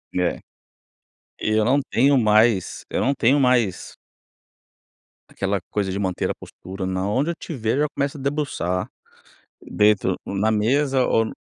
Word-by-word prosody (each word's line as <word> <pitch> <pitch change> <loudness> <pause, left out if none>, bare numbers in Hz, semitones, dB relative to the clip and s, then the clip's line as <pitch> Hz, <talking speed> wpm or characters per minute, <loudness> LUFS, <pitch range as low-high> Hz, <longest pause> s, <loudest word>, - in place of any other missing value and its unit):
É. 90 -1 0 1.0
Eu 110 0 +1
não 135 +4 +3
tenho 135 +3 +3
mais 110 -3 +2
eu - - -1
não 135 - +2
tenho 135 +5 +3
mais 120 -8 +1 1.3
aquela 100 0 -2
coisa 100 -2 -1
de 95 - -3
manter 95 -3 -1
a - - -2
postura 95 +1 -8
na 95 +1 -2
onde 135 +11 0
eu - - -6
tiver, 120 -10 -3
eu 145 - +1
já 150 - +2
começo 140 +1 -2
a - - -9
debruçar, 140 - -2 0.7
dentro 105 -3 +2
na 105 +3 0
mesa 130 +5 +2
ou 115 - +2
no - - -6
110 Hz, 150 wpm, -22 LUFS, 100-135 Hz, 1.3 s, não